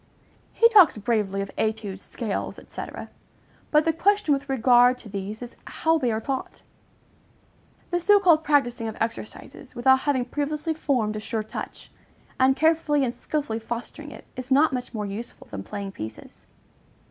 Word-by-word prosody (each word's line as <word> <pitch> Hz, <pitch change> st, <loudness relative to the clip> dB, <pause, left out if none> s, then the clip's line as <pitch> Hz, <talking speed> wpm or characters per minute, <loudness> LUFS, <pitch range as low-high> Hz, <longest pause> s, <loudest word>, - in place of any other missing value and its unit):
He 465 Hz, -, +5 dB
talks 390 Hz, -, +7 dB
bravely 205 Hz, -2 st, 0 dB
of 195 Hz, -, -7 dB
études, 215 Hz, -3 st, -2 dB
scales, 215 Hz, 0 st, -4 dB
&c. -, -, -6 dB, 0.9 s
but 300 Hz, 0 st, +4 dB
the 325 Hz, -, +2 dB
question 400 Hz, -1 st, +2 dB
with 280 Hz, 0 st, -3 dB
regard 250 Hz, -1 st, +5 dB
to 225 Hz, -, -13 dB
these 205 Hz, +3 st, -5 dB
is 240 Hz, -, -10 dB
how 320 Hz, 0 st, +1 dB
they 250 Hz, -5 st, +1 dB
are 220 Hz, -, -1 dB
taught. 265 Hz, +3 st, -5 dB, 1.3 s
The 350 Hz, -, +1 dB
so 410 Hz, +4 st, +5 dB
called 335 Hz, -5 st, +4 dB
practising 265 Hz, -6 st, +1 dB
of 220 Hz, -, -6 dB
exercises, 230 Hz, +3 st, -6 dB
without 265 Hz, +2 st, +4 dB
having 260 Hz, -3 st, 0 dB
previously 295 Hz, +4 st, -2 dB
formed 245 Hz, -9 st, 0 dB
a -, -, -3 dB
sure 220 Hz, 0 st, -3 dB
touch, 215 Hz, -, -8 dB, 0.5 s
and 260 Hz, +1 st, +5 dB
carefully 310 Hz, -2 st, +2 dB
and 240 Hz, -, -2 dB
skilfully 280 Hz, -8 st, -3 dB
fostering 240 Hz, +6 st, -6 dB
it -, -, -12 dB
is 255 Hz, 0 st, -7 dB
not 285 Hz, +1 st, +5 dB
much 250 Hz, -1 st, -4 dB
more 215 Hz, -3 st, -3 dB
useful 205 Hz, +4 st, -7 dB
than 100 Hz, -, -5 dB
playing 200 Hz, -, -6 dB
pieces. 110 Hz, -, -9 dB
250 Hz, 160 wpm, -25 LUFS, 220-300 Hz, 1.3 s, talks